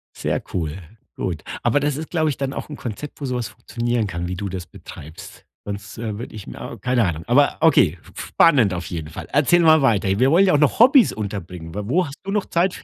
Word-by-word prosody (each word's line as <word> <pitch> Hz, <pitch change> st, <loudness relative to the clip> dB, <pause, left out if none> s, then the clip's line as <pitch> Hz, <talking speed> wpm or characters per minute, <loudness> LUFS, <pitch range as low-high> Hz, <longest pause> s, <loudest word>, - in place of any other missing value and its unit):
Sehr -, -, -2 dB
cool, 80 Hz, -2 st, -2 dB, 0.4 s
gut. -, -, -4 dB, 0.2 s
Aber 145 Hz, -, +3 dB
das 145 Hz, -1 st, 0 dB
ist, 160 Hz, +1 st, -6 dB
glaube 160 Hz, -3 st, +1 dB
ich, 140 Hz, -, -3 dB
dann 135 Hz, 0 st, -3 dB
auch -, -, -6 dB
'n 150 Hz, -, -6 dB
Konzept, 130 Hz, +5 st, -7 dB
wo -, -, -2 dB
so 125 Hz, -1 st, -2 dB
was 120 Hz, -2 st, -3 dB
funktionieren 120 Hz, -2 st, -2 dB
kann, 85 Hz, -1 st, -4 dB
wie 90 Hz, -, -4 dB
du 100 Hz, 0 st, -4 dB
das 90 Hz, -2 st, -6 dB
betreibst. 90 Hz, +9 st, -12 dB, 0.2 s
Sonst, 100 Hz, 0 st, -7 dB
äh, 110 Hz, -2 st, -4 dB
würde 120 Hz, -, -8 dB
ich 110 Hz, -3 st, -9 dB
mir -, -, -8 dB
keine 125 Hz, -2 st, +2 dB
Ahnung. 85 Hz, -2 st, -3 dB
Aber 140 Hz, +4 st, +3 dB
okay, 140 Hz, -, +4 dB
f -, -, -18 dB
f -, -, -6 dB
spannend 125 Hz, -, +4 dB
auf 90 Hz, -2 st, -4 dB
jeden 80 Hz, -3 st, -6 dB
Fall. -, -, -8 dB
Erzähl 150 Hz, +5 st, +4 dB
mal 160 Hz, -2 st, +6 dB
weiter. 110 Hz, -7 st, +2 dB
Wir 130 Hz, +4 st, +3 dB
wollen 190 Hz, +4 st, +5 dB
ja 185 Hz, -, +3 dB
auch -, -, +5 dB
noch 150 Hz, +6 st, +2 dB
Hobbies 260 Hz, +1 st, +6 dB
unterbringen. 90 Hz, -5 st, -6 dB
W 105 Hz, -, -2 dB
wo 175 Hz, -, +1 dB
hast 140 Hz, -, -9 dB
du 195 Hz, -, -4 dB
noch 210 Hz, -1 st, 0 dB
Zeit 180 Hz, +2 st, 0 dB
f -, -, -12 dB
120 Hz, 250 wpm, -21 LUFS, 95-150 Hz, 0.4 s, mal